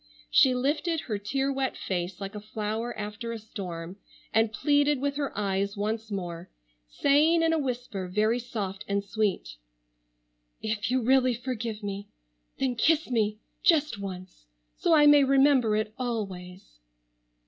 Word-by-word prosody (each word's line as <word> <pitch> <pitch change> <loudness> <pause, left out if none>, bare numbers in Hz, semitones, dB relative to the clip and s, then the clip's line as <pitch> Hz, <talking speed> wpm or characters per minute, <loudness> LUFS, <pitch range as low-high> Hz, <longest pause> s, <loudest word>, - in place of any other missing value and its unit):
She 255 -1 +5
lifted 300 +5 0
her 210 -4 -3
tear 270 +7 -1
wet 265 -1 -2
face 175 -1 -3
like 195 0 -6
a 210 - -5
flower 215 +2 -4
after 215 +3 -5
a 230 - -4
storm, 185 -5 -7 0.4
and 225 0 +3
pleaded 290 +3 +2
with 280 +1 -1
her 285 -2 -1
eyes 200 0 -1
once 220 +2 -2
more, 175 -3 -5 0.4
saying 305 - +3
in 325 0 +3
a 325 - +2
whisper 245 -8 -3
very 215 +6 +1
soft 205 -5 -5
and 200 0 0
sweet: 200 - -2 1.0
"If 220 0 -2
you 255 -1 +1
really 255 0 +4
forgive 235 -3 -4
me, 200 0 -5 0.5
then 265 -2 0
kiss 310 +4 +2
me, 215 -3 +1 0.2
just 305 - +3
once, 185 - -8 0.3
so 335 - +3
I 295 -1 +6
may 290 -1 +7
remember 270 -4 +4
it 215 0 -1
always." 190 - -5
220 Hz, 150 wpm, -27 LUFS, 200-270 Hz, 1.0 s, may